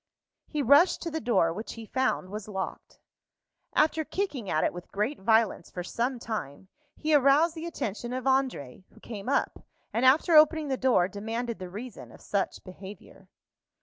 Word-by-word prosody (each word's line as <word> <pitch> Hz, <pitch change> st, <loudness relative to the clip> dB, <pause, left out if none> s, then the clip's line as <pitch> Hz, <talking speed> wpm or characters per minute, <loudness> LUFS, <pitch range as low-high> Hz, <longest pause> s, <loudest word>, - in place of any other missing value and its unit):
He 300 Hz, -2 st, -2 dB
rushed 285 Hz, +8 st, +5 dB
to 335 Hz, -, -4 dB
the 320 Hz, -, -3 dB
door, 190 Hz, -8 st, +2 dB
which 215 Hz, +6 st, -6 dB
he 225 Hz, -1 st, -9 dB
found 240 Hz, -6 st, -1 dB
was 210 Hz, 0 st, -6 dB
locked. 190 Hz, -2 st, -6 dB, 0.8 s
After 315 Hz, +1 st, +3 dB
kicking 295 Hz, -, -3 dB
at 155 Hz, -, +1 dB
it -, -, +1 dB
with 175 Hz, 0 st, -10 dB
great 215 Hz, +9 st, -2 dB
violence 220 Hz, -3 st, +2 dB
for 180 Hz, -, -6 dB
some 245 Hz, +7 st, -2 dB
time, 190 Hz, -, -6 dB, 0.3 s
he 310 Hz, 0 st, 0 dB
aroused 290 Hz, +4 st, +5 dB
the 330 Hz, 0 st, -6 dB
attention 240 Hz, -, -4 dB
of 255 Hz, 0 st, -3 dB
André, 260 Hz, -, 0 dB
who -, -, -19 dB
came 210 Hz, 0 st, -7 dB
up, 280 Hz, -, 0 dB, 0.3 s
and, 230 Hz, -, 0 dB
after 300 Hz, +6 st, +5 dB
opening 310 Hz, -1 st, +5 dB
the 265 Hz, -, +1 dB
door, 255 Hz, -9 st, +3 dB
demanded 225 Hz, +4 st, -4 dB
the 185 Hz, -1 st, -7 dB
reason 220 Hz, +5 st, -9 dB
of -, -, -15 dB
such 200 Hz, -1 st, -2 dB
behavior. 190 Hz, 0 st, -12 dB
235 Hz, 175 wpm, -28 LUFS, 195-280 Hz, 0.8 s, rushed